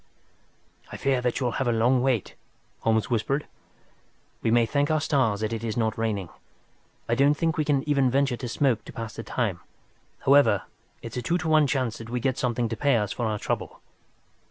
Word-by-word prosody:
"I - - -6
fear 135 -2 +1
that 125 -1 -1
you'll 125 -3 0
have 130 - 0
a - - +3
long 120 +3 +3
wait," 125 -6 0 0.5
Holmes 110 +2 +1
whispered. 135 +6 0 1.0
"We - - 0
may 120 0 +4
thank 145 +5 0
our 155 0 +2
stars 130 -9 +1
that 110 +1 -1
it 115 0 -4
is 110 -1 -3
not 110 -2 0
raining. 105 -6 -2 0.8
I 115 - +1
don't 140 +4 +4
think 165 +1 0
we 155 - 0
can 145 -1 +1
even 140 -3 +3
venture 135 -1 +1
to 125 - -5
smoke 120 -2 +1
to - - -10
pass 115 -1 -6
the - - -5
time. - - -2 0.6
However, 140 -8 +4 0.4
it's 115 +1 -6
a - - -1
two 170 +7 0
to 180 - -4
one 155 -2 +4
chance 130 -4 -1
that 115 0 -9
we 125 +1 -2
get 130 +1 -1
something 120 -1 0
to 115 - -3
pay 140 +1 +2
us 105 -3 0
for 120 - -2
our 105 -1 -1
trouble." - - -4
125 Hz, 205 wpm, -26 LUFS, 115-140 Hz, 1.0 s, may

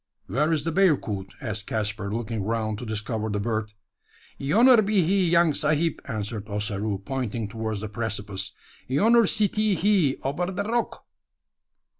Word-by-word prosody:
"Where 140 - +1
is 155 -3 +1
the 165 - -1
bearcoot?" 135 - +1
asked 110 -3 -3
Caspar, 105 -2 -2
looking 115 -1 -3
around 110 0 -2
to 120 - -7
discover 110 +1 -3
the 105 0 -1
bird. 110 0 -2 0.7
"Yonner 225 - +5
be 200 -2 +2
he, 185 +1 +2
young 170 -2 +4
sahib," 155 +3 +1
answered 110 -1 -4
Ossaroo, 105 0 -2
pointing 120 -5 -3
towards 110 -1 -4
the 110 - -3
precipice; 100 -3 -4 0.4
"yonner 225 - +4
sitee 210 0 +1
he 180 -7 +2
ober 145 +7 -1
da 195 +2 -2
rock." 230 +3 -2
115 Hz, 145 wpm, -25 LUFS, 105-170 Hz, 0.7 s, Yonner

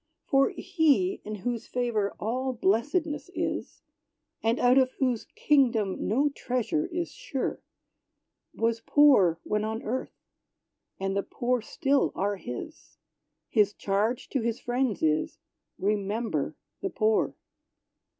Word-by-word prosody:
For 270 0 +4
He 365 +1 +1
in 215 +1 -5
whose 240 -2 -2
favor 235 -5 -1
all 255 +5 -1
blessedness 290 - 0
is; - - -3 0.6
And 225 +2 +2
out 250 +2 +5
of 260 -1 +2
whose 250 -4 0
kingdom 235 -9 +2
no 275 +8 +3
treasure 280 +4 -1
is 345 -1 -3
sure, 290 - -4 0.9
Was 230 0 +1
poor 225 - +5
when 210 0 -1
on 220 +1 -3
earth; 250 +4 -3 0.8
and 195 0 -1
the 200 - +2
poor 245 +3 -1
still 275 +5 +1
are 200 +1 0
his: 185 - -8 0.5
His 210 -2 +3
charge 210 +5 -1
to 270 - 0
his 230 0 -1
friends 245 -5 -1
is 155 0 +1 0.4
"Remember 210 +3 -1 0.3
the 390 - -1
poor." 220 - +1
240 Hz, 120 wpm, -28 LUFS, 210-275 Hz, 0.9 s, out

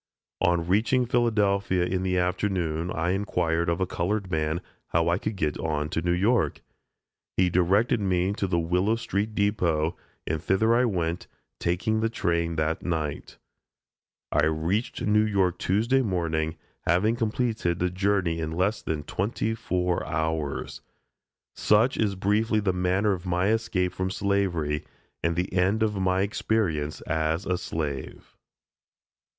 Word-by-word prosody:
On 85 -1 +2
reaching 115 +7 +2
Philadelphia 105 -6 +2
in 95 +1 -1
the 95 -1 0
afternoon 90 -2 0
I 85 +1 -1
inquired 85 -4 0
of 85 +1 0
a 95 - +2
colored 95 +2 -2
man 80 0 0 0.3
how 85 0 +1
I 85 +2 +1
could 110 0 -3
get 75 -5 -1
on 75 -2 -1
to 80 - -1
New 85 +1 0
York? 100 +6 +1 0.8
He 90 -1 +3
directed 95 +7 +3
me 95 -1 +1
to 100 - -2
the 90 -2 0
Willow 90 +6 +1
street 105 -1 -2
depot, 90 -6 +1 0.3
and 80 -1 -2
thither 105 +6 +2
I 125 +2 +4
went, 85 -5 -1 0.3
taking 95 +6 0
the 115 +1 +1
train 85 -6 0
that 80 +1 0
night. 80 -4 -3 0.9
I 75 - +3
reached 80 +9 -1
New 105 0 +4
York 95 -4 +1
Tuesday 115 +8 +2
morning, 80 -7 -1 0.3
having 95 +7 +3
completed 110 -6 0
the 90 0 0
journey 95 -3 +1
in 80 0 -3
less 95 +5 0
than 75 -2 -3
twenty 110 +3 -2
four 90 -5 -1
hours. 80 -2 -2 0.7
Such 110 +5 +3
is 105 -3 0
briefly 105 +3 +1
the 100 -3 0
manner 90 +3 +1
of 95 -1 -3
my 90 +3 +1
escape 110 -5 0
from 95 0 -2
slavery 95 -7 0 0.4
and 85 0 0
the 90 +2 -2
end 95 +4 +2
of 105 -1 0
my 95 0 +2
experience 95 -7 -1
as 80 +3 -1
a 90 - +1
slave. 75 -7 -5
90 Hz, 145 wpm, -26 LUFS, 85-105 Hz, 0.9 s, I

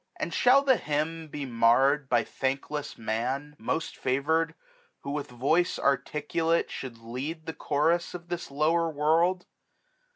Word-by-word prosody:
And - - -3
shall 265 +3 +5
the 265 -3 +4
hymn 155 +2 -2
be 145 -1 -5
marr'd 130 +4 +3
by 120 -1 +3
thankless 140 +2 -3
man, 125 +6 -2
1235 - - -17
Most 160 - -1
favour'd; 160 +5 0 0.5
who 140 - -5
with 145 -1 -3
voice 140 +8 +1
articulate 150 +4 0
Should 125 -3 -6
lead 130 +8 -6
the 160 - -4
chorus 160 +5 0
of 175 -1 -9
this 175 -1 -4
lower 160 +4 +2
world 165 +5 +2
150 Hz, 140 wpm, -28 LUFS, 135-165 Hz, 0.5 s, shall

